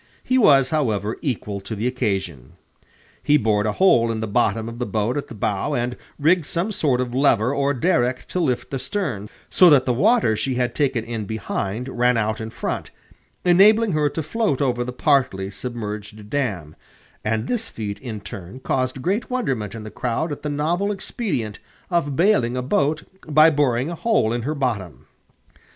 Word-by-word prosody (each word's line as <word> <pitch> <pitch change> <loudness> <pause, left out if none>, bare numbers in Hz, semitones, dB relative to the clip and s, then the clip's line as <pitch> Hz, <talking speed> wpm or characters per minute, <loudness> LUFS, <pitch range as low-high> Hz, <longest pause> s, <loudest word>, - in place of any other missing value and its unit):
He 255 0 +2
was, 135 - +5
however, 110 -8 0
equal 105 -8 -3
to 110 +3 -6
the 105 +3 -3
occasion. 100 - -2 0.7
He 145 +3 +4
bored 105 -4 +1
a 105 - 0
hole 120 - +4
in 110 - -3
the 110 - -2
bottom 110 0 +1
of 115 +1 -7
the 125 - -1
boat 110 +2 -1
at 145 - -3
the 120 - -10
bow, 105 +8 -1
and 120 0 -1 0.2
rigged 160 +1 +3
some 180 +6 -1
sort 140 -10 +1
of 125 -1 -2
lever 130 -2 +3
or 140 0 +1
derrick 130 -4 +1
to 185 - -2
lift 130 -8 -1
the 135 - -2
stern, 115 - -3 0.2
so 180 - +7
that 140 -4 +5
the 125 - +1
water 205 - +3
she 130 +4 -2
had 125 -1 0
taken 130 -5 0
in 115 -2 -4
behind 110 +2 -3
ran 125 -1 +2
out 110 0 -1
in 110 - -5
front, - - -4 0.6
enabling 205 +5 +5
her 150 -2 +2
to 160 +3 -4
float 210 - 0
over 125 -3 +1
the 125 - -5
partly 125 -8 +1
submerged 105 -1 -7
dam; 100 - -2 0.5
and 110 +1 -1
this 225 -2 -2
feat, 105 -2 -5
in 110 -4 -6
turn, 95 +5 -9
caused 130 0 -2
great 200 +6 -1
wonderment 130 - -2
in 110 - -7
the 110 - -8
crowd 130 +7 -2
at 145 - -5
the 150 - -3
novel 170 +8 0
expedient 190 - -3 0.3
of 150 -5 0
bailing 160 - +2
a 125 - -2
boat 145 +4 +1 0.2
by 155 +2 +6
boring 140 -1 +1
a - - -3
hole 170 - +1
in 120 - -1
her 150 +6 -2
bottom. 115 - -3
125 Hz, 185 wpm, -22 LUFS, 110-150 Hz, 0.7 s, so